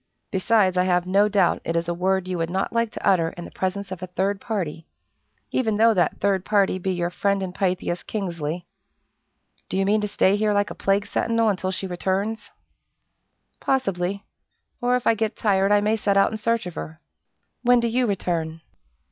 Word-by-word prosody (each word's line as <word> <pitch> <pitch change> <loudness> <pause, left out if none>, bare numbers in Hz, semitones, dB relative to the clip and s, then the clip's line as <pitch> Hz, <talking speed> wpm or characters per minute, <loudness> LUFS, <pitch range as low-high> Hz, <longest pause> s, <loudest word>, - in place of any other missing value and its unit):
"Besides, 190 -1 +2
I 180 - +3
have 180 -1 +2
no 200 +3 +3
doubt 195 -4 +2
it 165 - -2
is 170 0 0
a 175 - 0
word 185 +1 0
you 180 -2 -3
would 165 0 -1
not 190 +2 -2
like 230 -1 +1
to - - -4
utter 170 -4 +3
in 175 - -6
the - - -10
presence 190 +1 -3
of 185 -1 -6
a 185 - -5
third 195 +2 -1
party, 170 -8 -4 0.6
even 220 -5 0
though 225 +1 +5
that 180 -4 +1
third 195 -2 +1
party 200 -3 +2
be 190 - -2
your 175 -1 -1
friend 200 +1 0
and 180 -1 -5
Pythias, 180 -2 -1
Kingsley. 170 -5 -4 1.0
Do - - -2
you 195 - +2
mean 210 +2 +2
to 210 - -1
stay 200 0 +2
here 210 0 +1
like 205 0 +1
a - - -4
plague 195 +1 +1
sentinel 230 -1 +1
until 185 -2 -1
she 190 +1 -3
returns?" 195 +4 -2 1.1
"Possibly; 200 -7 -1 0.6
or 245 +1 +2
if 250 - -2
I - - +5
get 220 0 -2
tired 195 -2 +2
I 205 0 +5
may 215 +1 +2
set 200 -2 +1
out 195 - +4
in 220 - -3
search 230 0 0
of 180 - -6
her. 160 +1 -7 0.6
When 245 0 +5
do 235 - +1
you 245 +2 +1
return?" 165 -5 -2
195 Hz, 200 wpm, -24 LUFS, 180-210 Hz, 1.1 s, though